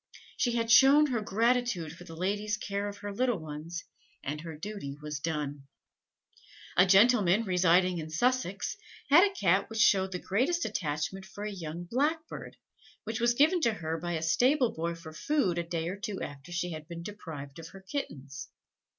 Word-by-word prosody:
She 240 - +1
had 230 -1 0
shown 280 +4 +7
her 235 -3 0
gratitude 225 -6 +1
for 180 - -12
the 165 -2 -10
lady's 205 +4 -1
care 200 -1 -3
of 205 0 -6
her 205 - -3
little 245 +1 +1
ones, 160 +2 -6 0.4
and 150 +2 -4
her 165 -2 -8
duty 180 -6 -6
was 150 -1 -5
done. 145 -3 -3 1.1
A 180 +2 +6
gentleman, 205 0 +5
residing 180 -2 +3
in 160 0 -6
Sussex, 205 - 0 0.3
had 335 +6 +9
a 405 - +3
Cat 190 - +2
which 225 - -6
showed 190 -4 +4
the 180 - -2
greatest 260 - 0
attachment 155 +4 -3
for 205 +2 -8
a 210 - -3
young 170 -3 -6
blackbird, 300 - -2 0.5
which 225 +2 -4
was 235 0 +3
given 320 +7 +4
to 230 -6 +3
her 165 -4 -3
by 175 +1 -3
a 160 -1 -2
stable 245 - +3
boy 170 +1 -2
for 165 -1 -11
food 190 - 0
a - - -1
day 165 -1 -3
or 185 +3 -4
two 200 -1 -4
after 140 +4 -8
she 175 0 -2
had 155 -1 -7
been 170 0 -7
deprived 160 -8 -8
of 165 - -8
her 195 +3 -13
kittens. 140 - -6
190 Hz, 185 wpm, -30 LUFS, 165-230 Hz, 1.1 s, had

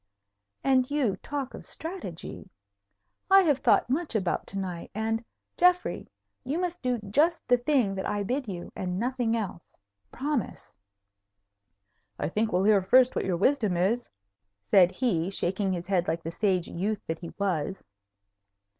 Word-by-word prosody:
And 260 -1 +3
you 275 -9 +1
talk 280 +2 -5
of - - -10
strategy! 355 +4 -7 0.8
I 390 0 +8
have 295 -6 +2
thought - - +4
much 290 +1 -1
about 190 -5 0
to 195 - -5
night, 180 -3 -4
and, 225 +1 -1 0.3
Geoffrey, 360 0 +2 0.3
you 275 +5 -2
must 355 -1 -2
do 250 -1 0
just 325 +7 +2
the 245 - +5
thing 245 -5 +1
that 190 -1 -3
I 205 0 -1
bid 255 +5 -2
you, 175 -3 -6
and 180 -1 -3
nothing 240 0 0
else. 195 -6 -5 0.4
Promise." 275 -2 -3 1.4
"I - - -2
think 215 +5 0
we'll 180 +1 +2
hear 205 -1 +5
first 255 +7 +5
what - - -1
your 180 -2 0
wisdom 210 -3 +2
is," 215 +8 +1 0.6
said 180 -2 +7
he, 190 -9 0
shaking 195 0 -1
his 175 -1 -3
head 180 -2 +1
like 165 +1 -1
the 165 - -4
sage 185 -2 0
youth 200 +4 -3
that 160 0 -3
he 170 - -8
was. 190 -2 -1
215 Hz, 155 wpm, -28 LUFS, 185-265 Hz, 1.4 s, I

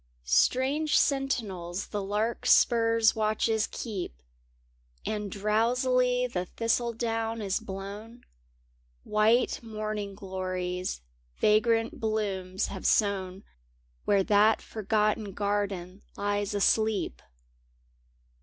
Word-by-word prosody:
Strange 265 - +2
sentinels 205 - -1
the 205 - -3
larkspur's 225 +2 +3
watches 220 0 +1
keep 190 - -6 0.9
And 210 -2 -3
drowsily 250 +5 +2
the 185 -7 -3
thistledown 230 +1 -1
is 200 -3 -1
blown; 205 +3 -8 0.8
White 220 +3 +2
morning 215 -3 -4
glories 185 - -4 0.4
vagrant 225 +6 +2
blooms 200 -5 -1
have 190 - -4
sown 195 -2 +1 0.6
Where 200 -1 +3
that 210 +2 +4
forgotten 215 -1 -1
garden 200 -2 -2 0.2
lies 205 0 -1
asleep. 205 - +1
215 Hz, 80 wpm, -28 LUFS, 195-230 Hz, 0.9 s, that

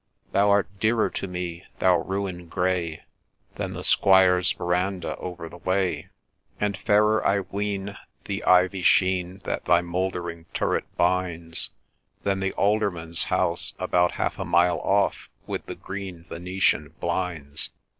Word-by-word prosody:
Thou 100 +1 +3
art 100 0 +4
dearer 110 +1 +2
to - - -4
me, 90 -1 -5
thou 90 -1 +4
Ruin 95 -1 -4
grey, 85 -2 -1 0.5
Than - - -3
the - - -6
Squire's 95 -2 +5
verandah 90 +1 -1
over 90 -2 -6
the 90 - -12
way; 95 0 -1 0.5
And 105 -1 0
fairer, 105 +2 +3
I 100 0 +2
ween, 100 +1 -3 0.3
The 100 0 -3
ivy 90 +1 +4
sheen 90 +1 +2
That - - -3
thy 85 -1 +4
mouldering 85 -1 -3
turret - - 0
binds, 85 -2 +1 0.5
Than 100 -1 0
the 95 0 -1
Alderman's 100 -6 +1
house - - 0
about 90 0 +2
half - - -2
a - - -1
mile 90 +1 +3
off, 100 0 +1 0.2
With - - -5
the - - -5
green 95 -4 -7
Venetian 90 -4 0
blinds. 80 -6 -2
90 Hz, 135 wpm, -25 LUFS, 85-100 Hz, 0.5 s, Squire's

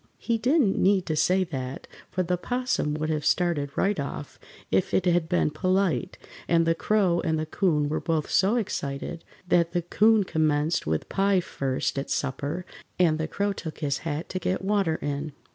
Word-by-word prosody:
He 230 -1 -1
didn't 250 -4 +2
need 190 -1 +3
to 155 - -1
say 185 +4 +3
that, 135 -6 -5 0.2
for 185 - -1
the 180 +1 0
'Possum 245 -7 -1
would 155 +1 -2
have 155 -1 -1
started 170 -6 +1
right 200 -3 +1
off 140 -1 -6 0.3
if 185 - +1
it 190 - +2
had 175 -2 +2
been 175 -4 +2
polite, 185 +3 0 0.3
and 165 -1 +3
the 165 - +3
Crow 185 -1 +2
and 160 -1 0
the 155 - -2
'Coon 155 -3 +1
were 155 +2 -1
both 160 -3 -1
so 200 +4 +3
excited 165 - -3 0.2
that 170 -2 +2
the 175 - 0
'Coon 215 +4 +4
commenced 155 - 0
with 80 0 -1
pie 195 -1 +2
first 135 -6 -2
at 135 - -5
supper 140 +5 -2 0.3
and 160 -3 +3
the 160 - -1
Crow 200 +4 -1
took 160 -4 -7
his 140 -2 0
hat 160 +1 -4
to 185 - -3
get 185 +2 -1
water 195 -5 +1
in. 145 +1 -3
170 Hz, 185 wpm, -26 LUFS, 150-190 Hz, 0.3 s, Coon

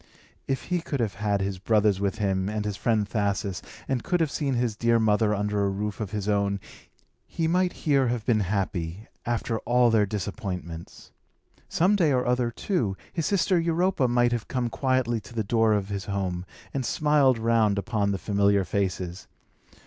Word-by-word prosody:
If 135 -1 -1
he 180 -1 -1
could 145 -4 -3
have 110 -4 0
had 105 -2 0
his 95 -1 -2
brothers 105 -1 +2
with 100 -1 -1
him, 95 -2 0
and 105 0 -2
his 105 -1 -2
friend 110 -1 +1
Thasus, 100 -3 -1 0.3
and 130 -3 -1
could 180 -2 0
have 160 -4 +1
seen 140 -4 -1
his 120 -3 0
dear 115 +1 +3
mother 110 -1 +3
under 105 0 0
a 100 - +2
roof 100 +1 -3
of 105 -4 -3
his 105 -1 -4
own, 100 -1 +1 0.7
he 165 - -1
might 180 +2 +2
here 140 -4 +3
have 120 -2 -2
been 115 -3 +3
happy, 95 -1 -2 0.2
after 115 -1 -1
all 120 -1 +3
their 105 -2 +3
disappointments. 95 -5 -6 0.6
Some 185 +5 +3
day 170 -7 +3
or 125 -2 +1
other, 125 -1 +1
too, 115 - -1 0.2
his 165 - -1
sister 190 -2 +2
Europa 170 -3 +1
might 120 0 +3
have 120 -3 -2
come 125 -2 -1
quietly 130 -3 +1
to 115 - -14
the 110 - 0
door 110 +1 +3
of 100 -1 -1
his 100 -1 -4
home, 95 -3 -2 0.3
and 135 - -1
smiled 145 -2 +3
round 110 -2 +2
upon 105 0 0
the 100 - -1
familiar 100 0 +2
faces. 95 -2 -2
110 Hz, 185 wpm, -26 LUFS, 100-125 Hz, 0.7 s, dear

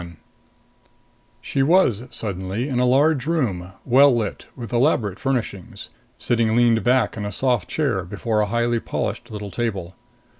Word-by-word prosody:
21 85 -2 -11 1.2
She 135 - -1
was, 135 - +3
suddenly, 100 +3 -3
in 130 -4 -1
a 125 - +3
large 140 +2 +3
room, 100 - -1
well 135 +3 +6
lit, 115 -4 -2
with 120 -4 -8
elaborate 120 - +1
furnishings 120 -8 -3 0.3
sitting 115 -2 +1
leaned 120 -2 +3
back 125 -2 +2
in 105 - -4
a 105 - -4
soft 125 +2 0
chair 135 - 0
before 105 +4 -2
a 105 - 0
highly 120 +2 0
polished - - -4
little 105 -2 -7
table. 100 -7 -3
115 Hz, 150 wpm, -22 LUFS, 100-130 Hz, 1.2 s, well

